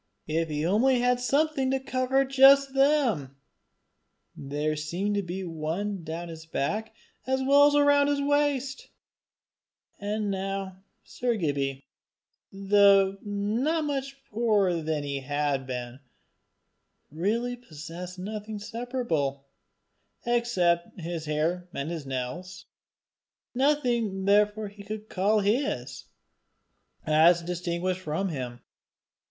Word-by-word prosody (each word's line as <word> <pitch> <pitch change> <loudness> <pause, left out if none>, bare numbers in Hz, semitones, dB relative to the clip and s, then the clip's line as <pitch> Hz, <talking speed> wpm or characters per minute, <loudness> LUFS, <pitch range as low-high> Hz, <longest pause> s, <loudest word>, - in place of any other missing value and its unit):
If 160 +1 -1
he 150 +1 -2
only 240 +8 +3
had 245 0 +2
something 275 +1 +1
to 265 0 +1
cover 265 +1 +1
just 270 +1 +6
them! 270 - +2 1.0
There 150 +2 -2
seemed 175 +7 -2
to 205 - +1
be 190 +1 -5
one 170 +4 -3
down 165 +2 -5
his 160 0 -10
back 215 +9 -2 0.3
as 265 0 +1
well 285 +2 +6
as 290 - +2
round 285 0 +4
his 285 -1 +1
waist! 280 -2 0 1.1
And 205 0 -2
now 195 -1 -4 0.2
Sir 245 -2 -2
Gibbie, 140 -7 -2 0.7
though 195 0 +4
not 220 +11 -1
much 275 -2 -3
poorer 205 -6 +2
than 155 -1 -2
he 140 -1 -3
had 140 -1 -1
been, 125 0 -5 1.1
really 225 +10 -1
possessed 175 -3 -9
nothing 210 +3 -5
separable, 210 - -3 0.8
except 190 -9 +1
his 165 -1 -5
hair 165 +4 -1
and 140 +4 -3
his 160 -5 -5
nails 135 +9 -5 0.9
nothing 245 -8 +1
therefore 210 +1 +3
that 205 - -21
he 200 - -9
could 215 +1 -7
call 205 +3 +2
his, 195 - -1 1.0
as 165 +3 +5
distinguished 180 +1 -2
from 185 +4 -2
him. 125 -6 -5
195 Hz, 115 wpm, -27 LUFS, 160-245 Hz, 1.1 s, just